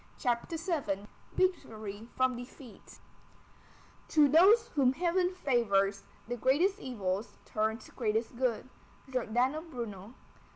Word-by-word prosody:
CHAPTER 245 +6 -1
VII 285 - -2 0.3
VICTORY 220 - -1
FROM 255 -1 +2
DEFEAT 245 0 -11 1.1
To 300 -2 +5
those 405 - +6
whom 265 - +3
heaven 355 +3 +1
favors, 205 - +1 0.2
the 245 +1 -3
greatest 320 - +2
evils 205 -4 -3
turn 220 +1 0
to - - -15
greatest 225 0 -1
good. 250 -1 -1 0.4
GIORDANO 255 +4 0
BRUNO. 230 -4 -7
250 Hz, 110 wpm, -31 LUFS, 220-310 Hz, 1.1 s, those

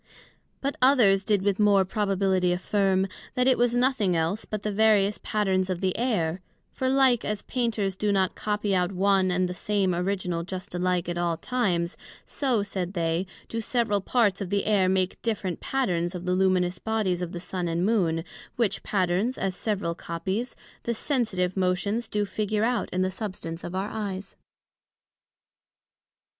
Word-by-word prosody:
But 275 +1 -2
others 230 -8 +5
did 200 -1 +1
with 200 0 +1
more 200 -2 +5
probability 195 -3 +1
affirm, 190 +1 +1 0.3
that 250 - +2
it 260 -1 +5
was 240 0 +2
nothing 245 -7 +2
else 165 +6 -1
but 210 -1 -5
the 210 - -1
various 210 -1 +3
patterns 190 -3 0
of 185 -2 -1
the 185 -1 0
Air; 185 -8 0 0.3
for 260 - -1
like 265 -3 +4
as 210 -1 -3
Painters 220 -6 -1
do 210 +2 0
not 190 -2 +2
copy 210 -1 -1
out 180 0 +1
one 190 0 +2
and 180 0 +1
the 180 - -4
same 195 0 0
original 180 -1 -1
just 185 +1 -6
alike 180 -1 0
at 175 0 -2
all 170 -1 0
times; 175 -5 -1 0.3
so, 250 -7 0
said 190 -2 -4
they, 170 +1 0 0.2
do 230 - -3
several 220 -3 +1
parts 205 -3 +1
of 190 - -3
the 200 0 0
Air 195 -3 +3
make 185 0 0
different 200 -6 -2
patterns 180 -9 -1
of 180 0 -6
the 180 - +1
luminous 185 -1 +2
Bodies 210 -5 0
of 175 -1 -3
the 175 - -5
Sun 180 0 -3
and 170 +2 0
Moon: 175 -7 +1 0.3
which 215 -5 0
patterns, 190 +5 0
as 190 -2 -2
several 195 -4 -1
copies, 190 +9 -4 0.3
the 235 - -2
sensitive 215 -9 0
motions 195 +5 0
do 210 -1 0
figure 210 +1 -1
out 235 -3 0
in 185 +1 0
the 185 - 0
substance 185 -5 -5
of 175 - -5
our 195 +2 -2
eyes. 195 -3 -5
195 Hz, 170 wpm, -26 LUFS, 180-215 Hz, 0.3 s, others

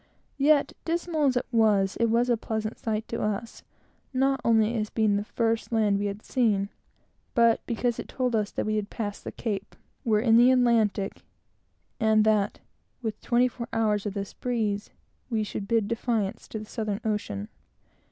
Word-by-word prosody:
Yet, 290 +1 +4
dismal 335 -2 0
as 260 -2 +3
it - - 0
was, 210 -4 +3
it 230 - +3
was 235 +2 +2
a 240 - +3
pleasant 220 0 -3
sight 220 0 -2
to 230 - -3
us; 210 +2 -3 0.5
not 270 0 +2
only 225 0 +3
as 215 -2 -1
being 215 -2 +2
the 205 - 0
first 225 +1 -1
land 210 -3 +2
we 205 - 0
had 200 +1 -5
seen, 210 -6 +1 0.7
but 230 -1 +4
because 235 0 -1
it - - -5
told 250 -3 -1
us 210 -2 +1
that - - -3
we 215 0 0
had 205 -1 -3
passed 205 -3 -5
the - - -5
Cape, 205 -3 -4 0.3
were 215 -3 +3
in 225 0 +5
the 240 +2 +7
Atlantic, 230 -6 +2 0.8
and 220 -1 +4
that, 210 -2 +1 0.4
with 220 -2 -3
twenty 245 +1 +3
four 235 -1 -6
hours 210 -2 +1
of 200 - -4
this 200 -1 -4
breeze, 220 -4 -2 0.4
might 215 -3 -2
bid 225 -2 +2
defiance 225 -3 -1
to - - -6
the 215 - -6
Southern 215 -2 -3
Ocean. 105 - -2
220 Hz, 175 wpm, -27 LUFS, 210-235 Hz, 0.8 s, the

